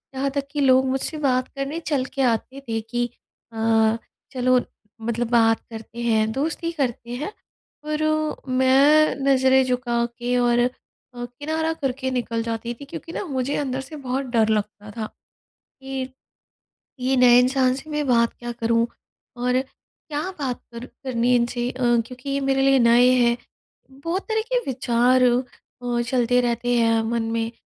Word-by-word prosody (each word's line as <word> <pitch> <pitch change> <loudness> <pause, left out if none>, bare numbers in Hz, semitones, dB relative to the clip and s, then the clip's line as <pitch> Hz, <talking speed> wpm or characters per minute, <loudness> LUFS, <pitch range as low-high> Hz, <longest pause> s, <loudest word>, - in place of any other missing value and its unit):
यहाँ 275 +1 0
तक 275 0 -1
कि 295 - -3
लोग 260 -1 +5
मुझसे 270 +4 -1
बात 255 -3 +1
करने 275 +4 -3
चल 265 -3 +1
के 275 - 0
आते 255 +2 0
थे 225 0 0
कि 240 +2 -2 0.5
अ, 225 0 +2 0.4
चलो 255 0 +3 0.4
मतलब 235 +1 -2
बात 225 -1 +4
करते 225 +1 -9
हैं, 220 -2 +2
दोस्ती 320 +5 -2
करते 245 -6 -3
हैं। 410 - -3 0.5
पर 305 0 -1 0.5
मैं 275 +4 +5
नज़रें 265 -1 +4
झुका 245 -2 0
के 245 +1 0
और 240 -1 +3
अ, 245 +1 +3 0.5
किनारा 300 +7 -3
करके 260 -3 -3
निकल 230 -1 -2
जाती 230 +1 -3
थी। 280 +4 -11
क्योंकि 330 +2 -8
न - - -3
मुझे 260 +3 -1
अंदर 265 -2 -2
से 315 - -8
बहुत 270 -1 -3
डर 220 -1 +4
लगता 210 0 -9
था 220 - -2 0.8
कि 265 -1 -4 0.9
ये 260 +1 +1
नए 245 -1 +7
इंसान 255 0 +3
से 275 +4 -9
मैं 300 -1 -1
बात 235 -2 +3
क्या 240 0 -5
करूँ? 230 0 +1 0.5
और 250 +1 +1 0.5
क्या 295 -1 -2 0.2
बात 260 -4 -2
कर 235 +2 -7
करनी 250 -2 0
इनसे? 240 0 0
अ, 260 - -9 0.3
क्योंकि 255 +2 -9
ये 275 - 0
मेरे 270 0 +2
लिए 270 -1 +4
नए 235 +1 +6
हैं। 240 -1 +3 0.7
बहुत 345 +3 -1
तरह 440 0 +1
के - - +3
विचार 250 0 +2
अ, 245 0 -1
चलते 245 0 +2
रहते 245 0 0
हैं 230 -1 +3
मन 235 -1 0
में। 230 0 -1
250 Hz, 160 wpm, -23 LUFS, 235-270 Hz, 0.9 s, नए